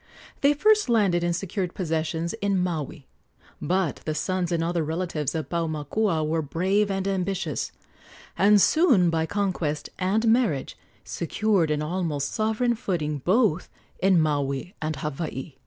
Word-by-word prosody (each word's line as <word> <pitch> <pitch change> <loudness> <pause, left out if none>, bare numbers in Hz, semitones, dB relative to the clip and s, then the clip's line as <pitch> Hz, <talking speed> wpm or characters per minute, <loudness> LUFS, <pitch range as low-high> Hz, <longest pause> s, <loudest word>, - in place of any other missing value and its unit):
They 285 +1 +4
first 425 +2 +3
landed 195 -7 +3
and 175 0 +1
secured 185 -1 -3
possessions 165 -1 -2
in 200 -1 +1
Maui; 160 -5 -3 0.6
but 180 -1 0
the 155 - -4
sons 185 +1 -1
and 165 -1 +1
other 170 0 0
relatives 160 -2 -2
of 160 - -3
Paumakua 165 +2 -1
were 160 +1 0
brave 190 +7 0
and 195 0 -1
ambitious, 185 - -2 0.6
and 205 +3 +5
soon 230 - +4
by 160 0 0
conquest 175 -7 -2
and 205 +5 +1
marriage 225 - +1 0.3
secured 190 -1 0
an 150 0 0
almost 155 -4 -2
sovereign 220 +3 +1
footing 165 - -2
both 185 - +2 0.3
in 190 -2 +4
Maui 145 +2 -1
and 155 0 -2
Hawaii. 150 -1 -5
175 Hz, 140 wpm, -25 LUFS, 155-200 Hz, 0.6 s, and